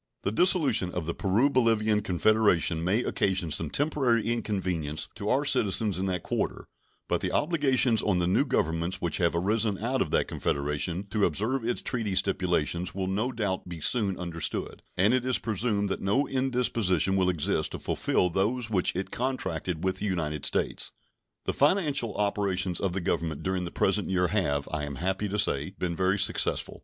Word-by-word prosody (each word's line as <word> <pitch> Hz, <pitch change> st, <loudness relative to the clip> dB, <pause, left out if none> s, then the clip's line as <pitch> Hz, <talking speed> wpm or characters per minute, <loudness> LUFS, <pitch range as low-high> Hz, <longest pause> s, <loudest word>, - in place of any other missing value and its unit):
The 100 Hz, -, 0 dB
dissolution 135 Hz, -, +3 dB
of 90 Hz, -3 st, -3 dB
the 85 Hz, -, -2 dB
Peru 105 Hz, +10 st, +2 dB
Bolivian 110 Hz, -5 st, +2 dB
Confederation 95 Hz, -4 st, +2 dB
may 100 Hz, +8 st, +1 dB
occasion 95 Hz, -4 st, -1 dB
some 80 Hz, +1 st, 0 dB
temporary 135 Hz, -, +1 dB
inconvenience 95 Hz, -10 st, -2 dB
to 105 Hz, -1 st, -4 dB
our 140 Hz, +3 st, +2 dB
citizens 105 Hz, -, +2 dB
in 95 Hz, -, -1 dB
that 90 Hz, -2 st, -2 dB
quarter, -, -, -2 dB, 0.4 s
but -, -, 0 dB
the -, -, -2 dB
obligations 135 Hz, -7 st, +2 dB
on 100 Hz, -4 st, +1 dB
the 90 Hz, -, +1 dB
new 90 Hz, +9 st, +3 dB
Governments 85 Hz, -, -1 dB
which 85 Hz, -3 st, -1 dB
have 85 Hz, -1 st, +1 dB
arisen 105 Hz, +3 st, +1 dB
out 125 Hz, +5 st, -1 dB
of -, -, 0 dB
that -, -, +1 dB
Confederation 75 Hz, +6 st, -2 dB
to 105 Hz, 0 st, 0 dB
observe 110 Hz, -, -1 dB
its 120 Hz, +1 st, -2 dB
treaty 110 Hz, -6 st, -2 dB
stipulations 90 Hz, -2 st, 0 dB
will 95 Hz, -1 st, -2 dB
no 105 Hz, +7 st, -1 dB
doubt 100 Hz, -7 st, -3 dB
be 85 Hz, -2 st, -7 dB
soon 100 Hz, +2 st, +1 dB
understood, 85 Hz, -3 st, -3 dB, 0.2 s
and 100 Hz, +6 st, +4 dB
it 130 Hz, -1 st, +2 dB
is 130 Hz, -1 st, +2 dB
presumed 105 Hz, -1 st, -1 dB
that 95 Hz, -, -3 dB
no 130 Hz, +9 st, +1 dB
indisposition 115 Hz, -, +1 dB
will 95 Hz, -1 st, +2 dB
exist 85 Hz, -5 st, 0 dB
to -, -, -3 dB
fulfill 90 Hz, -, 0 dB
those 110 Hz, +6 st, -1 dB
which 95 Hz, -4 st, +1 dB
it 95 Hz, +2 st, -3 dB
contracted 95 Hz, -, -3 dB
with 95 Hz, 0 st, 0 dB
the 105 Hz, -, -2 dB
United 75 Hz, -6 st, -1 dB
States. -, -, 0 dB, 0.5 s
The -, -, -1 dB
financial 145 Hz, -, +2 dB
operations 100 Hz, -3 st, 0 dB
of 95 Hz, -3 st, -1 dB
the 95 Hz, -, -2 dB
Government 80 Hz, -3 st, -2 dB
during 95 Hz, -1 st, -1 dB
the 85 Hz, -, -6 dB
present -, -, +1 dB
year 90 Hz, -1 st, +1 dB
have, 70 Hz, -9 st, 0 dB
I 75 Hz, -1 st, -2 dB
am 70 Hz, -1 st, -6 dB
happy 95 Hz, +6 st, -1 dB
to 105 Hz, -, -2 dB
say, 75 Hz, 0 st, +1 dB
been 85 Hz, -2 st, -2 dB
very 95 Hz, +3 st, +1 dB
successful. -, -, 0 dB
95 Hz, 180 wpm, -27 LUFS, 90-115 Hz, 0.5 s, and